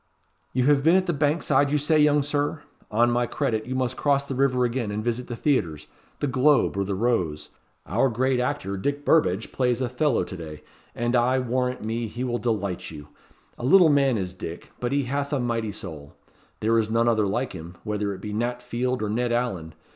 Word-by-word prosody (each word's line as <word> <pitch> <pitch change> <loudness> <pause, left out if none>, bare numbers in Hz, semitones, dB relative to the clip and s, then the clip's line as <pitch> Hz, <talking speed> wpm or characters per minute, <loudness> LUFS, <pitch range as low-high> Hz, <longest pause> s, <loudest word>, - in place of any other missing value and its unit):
"You 125 - +1
have 140 0 +3
been 165 +3 +5
at 190 0 +3
the 175 - 0
Bankside 145 -1 +2
you 150 - +3
say, 150 +2 +2
young 150 -1 +4
Sir? 145 +1 -2 0.3
On 120 +3 +3
my 120 0 +1
credit, 110 -1 -2
you 130 - -3
must 130 -1 -1
cross 140 -1 +1
the 135 - -3
river 130 -1 +2
again 120 -2 -2
and 105 +1 -3
visit 120 +1 -2
the 120 - -5
theatres 85 - 0 0.4
the - - +1
Globe 130 -1 +3
or 100 - 0
the 100 0 -2
Rose. 90 -10 -1 0.4
Our 120 +8 +2
great 130 +2 +1
actor, 125 -7 -2
Dick 145 +8 -2
Burbadge, 115 - +2
plays 125 -2 0
Othello 130 +1 +1
to 95 - -7
day, 80 -3 -9 0.3
and, 120 +1 0
I 125 +2 +3
warrant 125 -1 -1
me, 115 +1 -2
he 120 +4 -5
will 120 -1 -1
delight 100 -6 -2
you. 75 -2 -10 0.5
A - - -7
little 170 +5 +6
man 140 -4 +3
is 95 -2 -3
Dick, 85 -2 -8
but 120 0 -2
he 140 0 +1
hath 140 +3 -2
a 145 - 0
mighty 115 -3 -1
soul. 80 -8 -9 0.5
There 115 +1 +3
is 110 -1 -1
none 115 +1 +2
other 110 -3 +2
like 120 +6 -2
him, 85 0 -9
whether 105 -1 -2
it 95 -1 -7
be 105 0 -5
Nat 120 +3 -2
Field 125 0 -2
or - - -1
Ned 120 +2 0
Alleyn. 95 -10 -2
120 Hz, 210 wpm, -25 LUFS, 105-135 Hz, 0.5 s, little